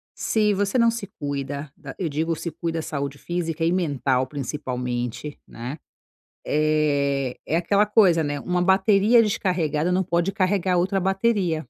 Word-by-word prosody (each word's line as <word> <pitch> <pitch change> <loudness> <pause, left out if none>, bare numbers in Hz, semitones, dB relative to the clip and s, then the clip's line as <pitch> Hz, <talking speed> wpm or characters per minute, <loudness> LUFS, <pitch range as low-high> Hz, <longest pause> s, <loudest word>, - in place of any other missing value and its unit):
Se 210 -2 +1
você 200 +4 0
não 235 -1 +4
se 230 -3 -5
cuida, 140 0 -4
da - - -10
eu 180 - -2
digo 160 +2 -1
se 170 +2 -5
cuida, 165 +1 -3
saúde 140 -2 -4
física 165 0 -3
e 170 - +2
mental, 140 -7 0
principalmente, 125 -1 -4
né. 125 +5 -7 0.7
Eh, 145 -3 +1
é 160 - 0
aquela 200 +5 +2
coisa, 190 -6 +4
né, 145 -1 -3
uma 180 0 -1
bateria 200 +5 +4
descarregada 180 -6 0
não 185 +1 +2
pode 175 +2 0
carregar 185 -2 +1
outra 190 +3 +1
bateria. 190 -3 +1
165 Hz, 150 wpm, -23 LUFS, 145-190 Hz, 0.7 s, não